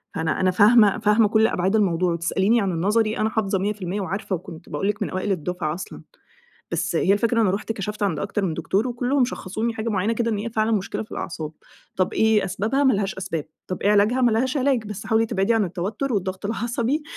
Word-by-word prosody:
فأنا 160 -1 -1
أنا 185 0 +3
فاهمة 210 +2 +5
فاهمة 210 +1 +4
كل 220 +1 +3
أبعاد 190 +2 0
الموضوع، 180 -4 +2
وتسأليني 190 +7 +1
عن 195 -2 0
النظري، 215 +6 +1
أنا 215 +1 +1
حافظة 200 -3 0
100% 200 -1 -2
وعارفة، 195 +1 -3
وكنت 165 0 -10
بأقول 195 - -2
لِك 210 +1 -2
من - - -3
أوائل 185 +2 -2
الدُفعة 175 -2 -2
أصلًا. 180 - -8 0.7
بس - - -1
هي 195 - +3
الفكرة 230 +2 +2
أنا 195 -4 +3
رُحت 205 +3 -3
كشفت 210 0 -4
عند 185 -6 0
أكتر 200 0 -2
من 165 - -1
دكتور 195 +8 0
وكُلهم 250 +2 +1
شخّصوني 225 0 -3
حاجة 225 +1 -3
معينة 210 +2 0
كده، 230 0 -1
إن 210 - 0
هي 215 +3 -3
فعلًا 220 0 0
مشكلة 210 0 -1
في - - -18
الأعصاب، 160 -3 -5 0.4
طب 185 - 0
إيه 220 -2 +3
أسبابها؟ 215 +9 0
ما 265 - +5
لهاش 195 -1 -1
أسباب، 180 -5 -4 0.2
طب 185 - -5
إيه 205 - +3
علاجها؟ 210 +5 +3
ما 240 -2 +4
لهاش 255 +5 +1
علاج، 260 -4 +1
بس 205 -1 -7
حاولي 225 0 +2
تبعدي 215 0 +1
عن 225 -2 +2
التوتر 205 +9 -3
والضغط 190 0 -2
العصبي 235 +6 -1
210 Hz, 215 wpm, -23 LUFS, 185-225 Hz, 0.7 s, فاهمة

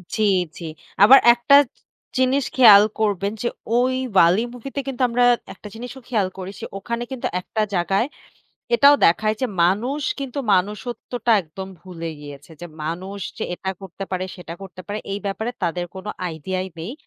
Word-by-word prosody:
জি, 215 - 0 0.3
জি। 170 - -9 0.4
আবার 265 +6 +9
একটা 245 +4 +4 0.2
চ - - -37 0.4
জিনিস 260 +1 +2
খেয়াল 210 -5 +9 0.2
করবেন 200 -2 0
যে, 240 - 0 0.3
ওই 255 +1 +2 0.2
'WALL·E' 185 +7 +5
মুভিতে 270 +3 -6
কিন্তু 260 -1 -4
আমরা 245 +1 +2 0.3
একটা 210 - -12
জিনিসও 250 +3 -8
খেয়াল 210 -6 +1
করেছি 190 +1 -8
ওখানে 235 +4 -4
কিন্তু 260 - -3
একটা 215 +3 -3
জাগায় 195 +7 +1 0.7
এটাও 280 +4 +7
দেখায় 215 +6 +2
যে 255 - +1 0.2
মানুষ 235 - +1 0.2
কিন্তু 275 0 -5 0.2
মনুষ্যত্বটা 225 +4 -2
একদম 190 +4 -9
ভুলে 170 -3 -7
গিয়েছে। 145 +1 -11
যে 175 - -6 0.2
মানুষ 185 +5 -5 0.2
যে - - -2
এটা 190 +2 -4
করতে 195 +1 -7
পারে, 185 0 -2
সেটা 170 -2 -8
করতে 185 -1 -10
পারে, 205 +1 -4
এই 200 - -2
ব্যাপারে 220 +4 -2
তাদের 175 +1 -1
কোনো 190 +2 -8 0.2
আইডিয়াই 185 +4 -4
নেই। 175 +10 -5
205 Hz, 160 wpm, -22 LUFS, 185-245 Hz, 0.7 s, আবার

